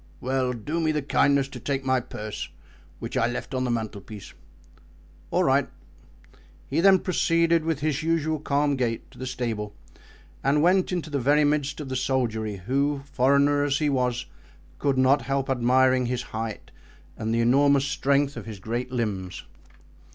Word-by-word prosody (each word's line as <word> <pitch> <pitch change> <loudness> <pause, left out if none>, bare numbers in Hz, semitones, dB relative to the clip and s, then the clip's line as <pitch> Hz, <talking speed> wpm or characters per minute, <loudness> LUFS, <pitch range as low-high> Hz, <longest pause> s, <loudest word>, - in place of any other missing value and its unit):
"Well, 130 0 0
do 145 +8 -3
me 160 -1 +1
the 150 -2 -1
kindness 140 -1 +2
to - - -8
take 135 -1 -2
my 130 -1 +3
purse, 110 -3 -6 0.5
which - - -6
I 115 - +2
left 125 +2 -5
on 130 0 0
the - - -1
mantelpiece." 110 -2 -5 1.0
"All - - +2
right." - - +2 1.0
He - - -1
then 195 +1 +7
proceeded, 170 -2 +2
with 160 -3 -1
his 150 -2 0
usual 160 -1 0
calm 145 0 +1
gait, 120 -3 -2
to - - -16
the 130 - -4
stable 115 -5 -3 0.7
and 145 +2 +3
went 185 +2 +3
into 170 -4 -3
the 140 - 0
very 145 +4 +3
midst 145 0 0
of 145 -3 -6
the 130 - -3
soldiery, 115 -5 -1
who, 140 +3 0
foreigner 140 +2 +3
as 145 -1 +1
he 150 -2 +1
was, 125 -2 0 0.5
could 140 -2 +1
not 130 +2 +4
help 135 0 -1
admiring 130 0 +3
his 125 0 -2
height 110 -1 -5 0.4
and 110 +1 -3
the 115 +1 +2
enormous 140 +3 +4
strength 140 +1 +1
of - - -8
his 110 -2 -7
great 120 +5 -4
limbs. 100 -7 -3
135 Hz, 165 wpm, -25 LUFS, 120-145 Hz, 1.0 s, then